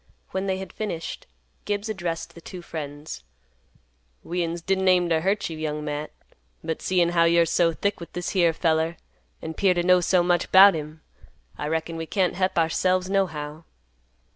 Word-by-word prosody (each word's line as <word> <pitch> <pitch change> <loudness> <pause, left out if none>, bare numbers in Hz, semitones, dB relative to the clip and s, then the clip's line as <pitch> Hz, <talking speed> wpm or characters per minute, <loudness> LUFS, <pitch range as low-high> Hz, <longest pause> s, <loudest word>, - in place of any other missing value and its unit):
When 190 +1 -2
they 190 -1 0
had 190 0 -8
finished, 190 -7 -5 0.4
Gibbs 205 +1 -2
addressed 175 -6 -4
the 170 - -13
two 180 +1 -9
friends; 145 - -7 1.0
"We'uns 170 -1 -3
didn't 190 +1 +1
aim 180 -1 +4
to 160 -1 +2
hurt 200 +4 0
you, 165 - -6
Young 150 -1 -3
Matt, 150 0 -3 0.5
but 160 -1 -3
seein' 180 -2 +2
how 170 -1 +3
you're 170 0 +4
so 170 +1 +2
thick 200 +5 -2
with 170 - -10
this 175 0 -3
here 175 -4 +3
feller, 160 0 0 0.5
an' 160 - -4
'pear 185 +2 +2
to 175 - +1
know 180 0 +5
so 175 0 +3
much 175 -1 +1
'bout 195 +1 +9
him, 155 0 -6 0.5
I 150 - -4
reckon 160 +1 -2
we 165 0 -5
can't 185 -1 +1
hep 185 0 -1
ourselves 185 +3 +1
nohow." 155 -5 -1
170 Hz, 175 wpm, -25 LUFS, 160-185 Hz, 1.0 s, bout